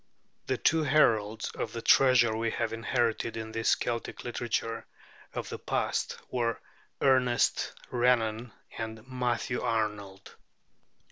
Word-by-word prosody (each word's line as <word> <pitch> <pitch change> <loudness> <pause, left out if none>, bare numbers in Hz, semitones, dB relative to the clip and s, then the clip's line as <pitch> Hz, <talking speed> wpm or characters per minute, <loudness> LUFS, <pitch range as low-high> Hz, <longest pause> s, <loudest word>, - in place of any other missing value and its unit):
The 130 - 0
two 160 +5 +3
heralds 115 -8 +2
of - - -5
the 115 - -4
treasure 125 -4 +5
we 115 +1 0
have - - -2
inherited 115 0 -1
in 110 0 -5
this 115 0 +2
Celtic 115 -1 -4
literature 115 -1 -3 0.4
of - - -5
the - - -6
past - - -1
were 115 -2 0 0.4
Ernest 130 -2 +3 0.2
Renan 120 -2 +1 0.3
and 110 +1 -6
Matthew 125 -2 -1
Arnold. 105 -4 -3
115 Hz, 120 wpm, -29 LUFS, 110-125 Hz, 0.4 s, treasure